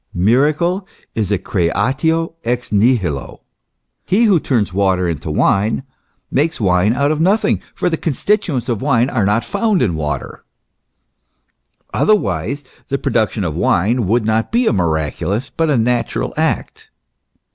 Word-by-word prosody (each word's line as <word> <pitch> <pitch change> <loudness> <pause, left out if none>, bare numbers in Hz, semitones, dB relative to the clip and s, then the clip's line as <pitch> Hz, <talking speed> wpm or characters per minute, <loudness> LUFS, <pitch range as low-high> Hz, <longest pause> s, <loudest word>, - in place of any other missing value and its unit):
Miracle 150 - +2 0.3
is 105 -3 -2
a 105 - +3
creatio 135 - 0
ex 125 +1 -2
nihilo. 100 - 0 0.6
He 210 +6 +2
who 200 -7 +4
turns 115 -11 0
water 95 -2 +1
into 80 -2 -4
wine, 100 - +1 0.5
makes 155 +4 0
wine 95 +2 +2
out 140 +3 +1
of 155 0 -1
nothing, 195 +5 +2
for - - -1
the 165 -2 0
constituents 165 - -1
of 115 -5 -2
wine 130 -2 +2
are 110 -6 +1
not 105 +3 +1
found 205 -1 +1
in 100 - +1
water; 75 -1 -4 1.5
otherwise, 140 - +1 0.2
the 140 - -1
production 110 -4 0
of 80 -4 -2
wine 105 +6 +1
would 115 +2 +1
not 110 +1 0
be 240 +2 +2
a - - +2
miraculous, 85 - -1
but 165 -1 0
a 145 - +3
natural 120 +1 0
act. - - -2
120 Hz, 140 wpm, -17 LUFS, 95-150 Hz, 1.5 s, who